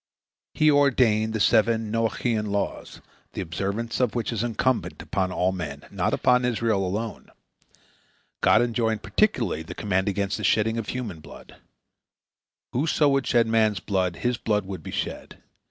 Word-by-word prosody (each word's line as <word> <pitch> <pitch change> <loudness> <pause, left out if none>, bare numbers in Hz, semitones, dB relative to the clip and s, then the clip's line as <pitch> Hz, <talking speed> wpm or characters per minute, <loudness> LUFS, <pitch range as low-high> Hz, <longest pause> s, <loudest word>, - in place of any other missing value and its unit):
He 155 0 +4
ordained 120 -6 +3
the 110 - -1
seven 110 0 +3
Noachian 115 -1 0
laws, 100 0 -3 0.3
the - - -3
observance 100 +7 -3
of 125 -4 +1
which 120 0 -1
is 110 - -2
incumbent 120 +2 -1
upon 95 -1 -2
all 90 +1 +1
men, 75 -6 -6
not - - 0
upon 125 0 +3
Israel 115 -4 +1
alone. 105 +4 -4 1.1
God - - +5
enjoined 115 -2 -1
particularly 125 - +1
the 80 - -9
command 95 -1 0
against 100 0 -1
the - - -6
shedding 110 +1 +2
of 110 - -5
human 115 -10 -4
blood. - - -14 1.2
Whoso 150 +2 +2
would 135 -1 +1
shed 120 -1 +3
man's 110 -3 +2
blood, 95 -2 -1
his 125 +4 -1
blood 105 -3 0
would 95 -1 -6
be - - -8
shed. - - -5
110 Hz, 155 wpm, -25 LUFS, 100-120 Hz, 1.2 s, God